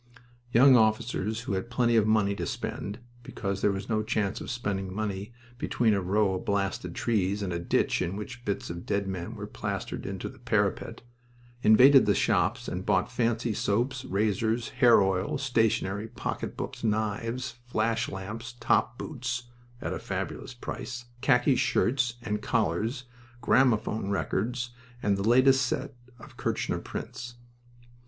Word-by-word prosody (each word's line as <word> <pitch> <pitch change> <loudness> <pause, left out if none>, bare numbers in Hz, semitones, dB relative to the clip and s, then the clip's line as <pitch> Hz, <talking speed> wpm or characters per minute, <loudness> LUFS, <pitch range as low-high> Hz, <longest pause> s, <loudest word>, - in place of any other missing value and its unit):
Young 130 +3 +7
officers, 110 -1 +1
who 110 - -3
had 95 +5 -2
plenty 120 -1 +2
of 110 -2 +4
money 105 -2 +3
to - - -4
spend 100 +1 -4 0.2
because 100 -4 -4
there 105 - +3
was 95 0 -4
no 110 -2 +1
chance 110 -2 -1
of - - -6
spending 100 -7 -2
money 100 +1 -3 0.3
between 115 -3 +2
a 100 - +1
row 100 +2 +2
of 95 - -3
blasted 100 -3 -1
trees 100 -3 0
and 90 -3 -2
a 85 - -2
ditch 85 - +1
in 90 +1 -2
which 120 +4 -7
bits 100 -5 -3
of 85 0 -6
dead 100 0 0
men 95 +4 -4
were 105 -1 -6
plastered 100 -2 -4
into - - -4
the - - -11
parapet - - -1 0.6
invaded 130 +4 +7
the 100 - +4
shops 110 +4 +1
and 90 +1 -3
bought 120 - +1
fancy 120 -1 0
soaps, 125 +7 0
razors, 110 +3 0
hair 120 -4 +5
oil, 95 +4 0
stationery, 110 -6 +1
pocketbooks, - - -5
knives, 115 +3 -1
flash 115 0 0
lamps, 110 +6 -6
top 120 0 +2
boots 120 -4 -4 0.3
(at - - -2
a - - -4
fabulous 130 - -5
price), 120 0 -6 0.2
khaki 125 0 +4
shirts 120 0 +1
and 105 -2 -2
collars, 115 - 0 0.4
gramophone 110 -4 +2
records, 120 +5 -1 0.3
and 100 -1 +3
the 100 +3 0
latest 130 +2 +5
set 135 +3 -2 0.2
of - - -14
Kirchner - - -1
prints. 120 0 -7
110 Hz, 150 wpm, -28 LUFS, 100-120 Hz, 0.6 s, Young